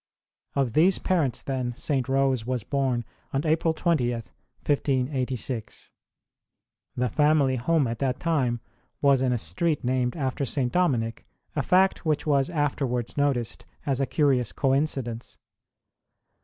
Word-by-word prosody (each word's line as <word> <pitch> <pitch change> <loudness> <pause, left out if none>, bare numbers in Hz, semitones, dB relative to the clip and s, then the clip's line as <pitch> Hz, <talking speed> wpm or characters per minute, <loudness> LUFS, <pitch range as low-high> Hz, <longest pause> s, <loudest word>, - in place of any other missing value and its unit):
Of 135 -5 +1
these 175 +6 +4
parents, 160 -9 0
then, 130 -3 -2
St. 135 -3 -1
Rose 135 -3 +2
was 125 -1 -2
born 130 -3 0 0.3
on 135 +3 0
April 160 +1 +2
20, 160 -6 +1
1586. 125 +2 -3 1.0
The 125 0 +1
family 145 0 +3
home 150 +4 +2
at 115 -1 -3
that 130 -2 -1
time 130 -8 0 0.4
v/as 140 -2 +5
in 130 -1 +2
a 125 - +1
street 135 - -1
named 125 0 0
after 135 -1 -1
St. 130 -2 -1
Dominic, 120 -11 0 0.3
a - - +1
fact 190 +1 +3
which 155 -3 0
\vas 140 -2 +2
afterwards 135 -6 -1
noticed 135 -6 0 0.2
as 140 -2 0
a 135 - +1
curious 135 -6 +2
coinci 135 0 +1
dence. 115 0 -8
135 Hz, 135 wpm, -26 LUFS, 125-150 Hz, 1.0 s, v/as